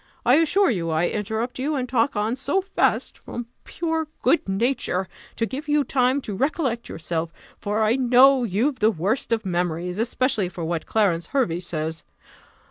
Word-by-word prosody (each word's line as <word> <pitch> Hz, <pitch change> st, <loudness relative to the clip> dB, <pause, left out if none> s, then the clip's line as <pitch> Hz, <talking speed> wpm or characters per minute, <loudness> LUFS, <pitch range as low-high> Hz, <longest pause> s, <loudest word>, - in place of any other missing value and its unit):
I 255 Hz, -, +6 dB
assure 330 Hz, +2 st, +3 dB
you 170 Hz, -6 st, -2 dB
I 160 Hz, +2 st, +1 dB
interrupt 220 Hz, +4 st, -3 dB
you, 295 Hz, +4 st, -1 dB
and 255 Hz, -2 st, -2 dB
talk 245 Hz, +1 st, +1 dB
on 215 Hz, +3 st, 0 dB
so 280 Hz, +7 st, 0 dB
fast, 385 Hz, 0 st, 0 dB
from 240 Hz, -, -6 dB, 0.2 s
pure 320 Hz, -2 st, -2 dB, 0.2 s
good 335 Hz, -, +2 dB
nature, 195 Hz, -3 st, 0 dB, 0.3 s
to 230 Hz, -, 0 dB
give 270 Hz, +6 st, -6 dB
you 295 Hz, 0 st, +3 dB
time 260 Hz, +1 st, +1 dB
to 210 Hz, -, -5 dB
recollect 265 Hz, -, -1 dB
yourself; 165 Hz, 0 st, -3 dB, 0.3 s
for 210 Hz, +2 st, 0 dB
I 220 Hz, +4 st, +3 dB
know 255 Hz, +1 st, +5 dB
you've 240 Hz, +6 st, 0 dB
the 215 Hz, -, +4 dB
worst 220 Hz, -, -1 dB
of 225 Hz, -2 st, 0 dB
memories, 180 Hz, +1 st, -2 dB
especially 230 Hz, -4 st, 0 dB
for 170 Hz, -2 st, -6 dB
what 165 Hz, 0 st, -3 dB
Clarence 185 Hz, -6 st, +1 dB
Hervey 240 Hz, -12 st, 0 dB
says. 160 Hz, -2 st, -4 dB
230 Hz, 170 wpm, -23 LUFS, 180-270 Hz, 0.3 s, I